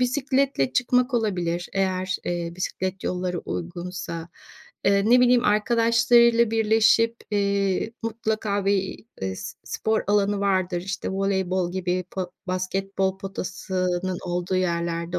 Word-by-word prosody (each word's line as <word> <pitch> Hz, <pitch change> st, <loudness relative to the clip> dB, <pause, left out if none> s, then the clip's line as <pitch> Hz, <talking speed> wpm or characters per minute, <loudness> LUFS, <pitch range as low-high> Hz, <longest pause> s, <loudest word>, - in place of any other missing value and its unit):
bisikletle 260 Hz, -, +1 dB
çıkmak 250 Hz, +1 st, +2 dB
olabilir 175 Hz, -6 st, -1 dB
eğer, 185 Hz, -1 st, 0 dB
eee, 170 Hz, -1 st, -2 dB
bisiklet 185 Hz, +1 st, -3 dB
yolları 180 Hz, -1 st, -2 dB
uygunsa, 175 Hz, -1 st, -5 dB, 0.6 s
eee, 200 Hz, 0 st, +4 dB
ne 250 Hz, -, +7 dB
bileyim, 250 Hz, 0 st, +4 dB
arkadaşlarıyla 235 Hz, +2 st, +4 dB
birleşip, 225 Hz, +1 st, +3 dB
eee, 200 Hz, +1 st, 0 dB
mutlaka 215 Hz, -3 st, -1 dB
bir, 195 Hz, +1 st, 0 dB, 0.2 s
eee, 95 Hz, 0 st, -2 dB
s 95 Hz, -, -7 dB
spor 220 Hz, 0 st, -1 dB
alanı 205 Hz, 0 st, +2 dB
vardır, 185 Hz, -3 st, +1 dB
işte, 195 Hz, +1 st, -4 dB
voleybol 190 Hz, -2 st, 0 dB
gibi 185 Hz, -1 st, -1 dB
po 185 Hz, -2 st, -4 dB, 0.2 s
basketbol 190 Hz, +1 st, -1 dB
potasının 185 Hz, -2 st, -3 dB
olduğu 180 Hz, +1 st, -1 dB
yerlerde 170 Hz, -1 st, -1 dB
195 Hz, 115 wpm, -24 LUFS, 180-220 Hz, 0.6 s, ne